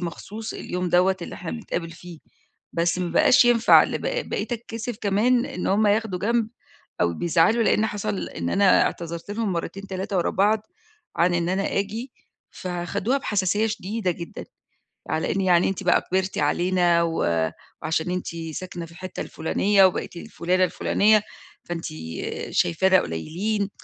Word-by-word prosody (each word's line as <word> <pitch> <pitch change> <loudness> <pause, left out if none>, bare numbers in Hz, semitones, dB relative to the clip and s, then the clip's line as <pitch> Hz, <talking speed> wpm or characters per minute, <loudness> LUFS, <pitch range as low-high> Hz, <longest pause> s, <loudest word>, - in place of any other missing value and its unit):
مخصوص 210 +6 -6
اليوم 180 0 -3
دوّة 180 +2 +3
اللي - - -7
إحنا 180 - -6
بنتقابل 175 -7 -4
فيه 170 -1 -11 0.5
بس 170 +1 +1
ما 175 -2 -2
بقاش 245 - +5
ينفع 240 -1 +6
ل - - -3
ب - - -11 0.3
بقيت - - -2
أتكسِف 230 0 -5
كمان 235 +5 +2
إن 280 - -5
هم 210 +2 +3
ياخدوا 205 -3 +1
جنب 225 +2 +1 0.5
أو 85 -1 +2
بيزعلوا 175 - +3
لإن 220 0 +3
حصل 210 -1 -3
إن - - -4
أنا 195 -1 +5
اعتذرت 170 +3 -4
لهم 210 -2 -1
مرتين، 180 +3 -4
3 190 0 -3
ورا 170 - +1
بعض 210 +2 +1 0.5
عن 175 +1 +3
إن 175 0 0
أنا 195 +1 0
آجي، 225 +6 -4 0.4
فخدوها 185 +8 -2
بحساسية 205 -1 +1
شديدة 210 -1 -2
جدًا 170 0 -8 0.7
على 155 +2 0
إن 195 - 0
يعني 180 -2 +4
أنتِ 195 +1 -4
بقى 180 - +4
كِبرتِ 190 +1 -2
علينا 175 -1 +2
و 165 -1 -2 0.7
وعشان 160 +2 -1
أنتِ 180 0 -3 0.3
ساكنة 175 -1 -6
في 165 - -15
الحتّة 185 +1 -7
الفُلانية 195 +5 +2
وبقيتِ 185 - -1
الفلُانة 180 +2 0
الفلُانية، 210 +3 +3 0.4
فأنتِ 170 -1 -5 0.7
شايفانا 190 +2 +3
قليّلين. 195 - -2
190 Hz, 150 wpm, -24 LUFS, 175-215 Hz, 0.7 s, ينفع